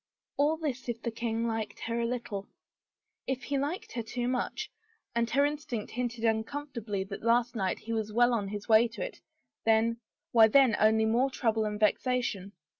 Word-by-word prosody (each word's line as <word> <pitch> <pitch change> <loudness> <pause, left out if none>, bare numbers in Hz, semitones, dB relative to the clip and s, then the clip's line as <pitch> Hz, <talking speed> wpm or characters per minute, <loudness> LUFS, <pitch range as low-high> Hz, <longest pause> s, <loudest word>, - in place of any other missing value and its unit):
All 300 +3 +2
this 270 -6 -4
if 235 -1 -2
the 235 - -1
king 230 0 -2
liked 225 -2 -3
her 230 +1 -2
a 235 - 0
little. 225 -5 -4 0.8
If 260 -1 -2
he 280 -1 -1
liked 295 +7 -3
her 235 - -3
too 240 +2 -3
much 260 - -2 0.2
— 445 - -42
and 235 0 +1
her 280 +3 +3
instinct 290 -7 -3
hinted 240 -1 -2
uncomfortably 225 -2 -2
that 195 +1 -7
last 235 +2 +2
night 190 -4 0
he 230 - -5
was 220 -1 -2
well 240 +2 +4
on 210 -4 0
his 205 +1 -6
way 225 +1 +6
to 230 - -6
it - - -9 0.2
— - - -56
then 225 +1 +3 0.2
— - - -62
why 225 -2 +7
then 255 -1 +5
only 220 +1 +4
more 240 +5 +2
trouble 225 -4 0
and 210 0 -3
vexation. 215 -2 0
235 Hz, 195 wpm, -30 LUFS, 220-250 Hz, 0.8 s, why